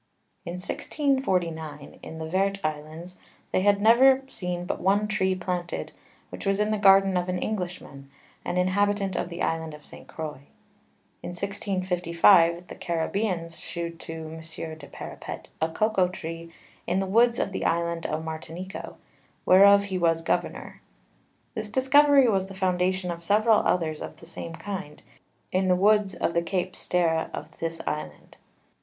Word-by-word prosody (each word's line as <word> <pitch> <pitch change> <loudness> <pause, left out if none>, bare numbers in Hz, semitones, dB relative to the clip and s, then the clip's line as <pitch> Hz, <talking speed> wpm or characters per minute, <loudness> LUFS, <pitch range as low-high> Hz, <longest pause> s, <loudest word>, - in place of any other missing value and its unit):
In 170 - -4
1649[q] 180 - -2
in 160 - -9
the 160 0 -5
Vert 195 +3 +1
Islands, 155 +4 -5 0.3
they - - +2
had 200 +1 +4
never 260 +5 +6
seen 180 -5 -4
but - - -3
one 200 +3 +2
Tree 190 -3 +1
planted, 180 -1 -4 0.4
which - - -7
was 195 0 +1
in 210 +1 +1
the 215 - 0
Garden 195 -1 +6
of 180 0 -1
an 180 - 0
English 180 -3 -3
Man, 140 -1 -13 0.3
an 180 - -2
Inhabitant 195 +1 +1
of - - -2
the 170 0 -4
Island 160 -1 -2
of 150 - -15
_St. - - -13
Croix_[r]. 155 -3 -6 0.8
In 175 - -6
1655, 180 -3 +2
the - - -9
_Caribeans_[s] 170 0 -2
shewed 170 -1 -5
to 160 0 -7
M. 160 +1 -8 0.4
du 140 - -11
Parepet - - -8
a 160 - +3
Cocao 195 +1 +2
Tree 165 -1 -7 0.4
in 180 - +1
the 195 - +1
Woods 230 +5 +3
of - - -1
the - - -3
Island 170 0 0
of 155 +1 -3
Martinico, 165 +4 -7 0.5
whereof 200 +2 +7
he 190 -2 -3
was 165 -1 +2
Governour. - - -2 0.7
This 215 -2 -4
discovery 275 +3 +5
was 190 -4 +1
the 195 - -10
Foundation 185 -1 0
of 170 0 -7
several 215 +4 +4
others 160 -3 0
of - - -7
the - - -14
same 165 0 -7
kind, 190 -5 -7 0.5
in 185 +1 +1
the 180 - +4
Woods 205 +1 +3
of 170 - -1
the 170 - +2
_Cape 180 +2 -2
Sterre_[t] 165 -2 0
of - - -9
this 165 0 -3
Island. 80 - -5
180 Hz, 160 wpm, -26 LUFS, 165-200 Hz, 0.8 s, whereof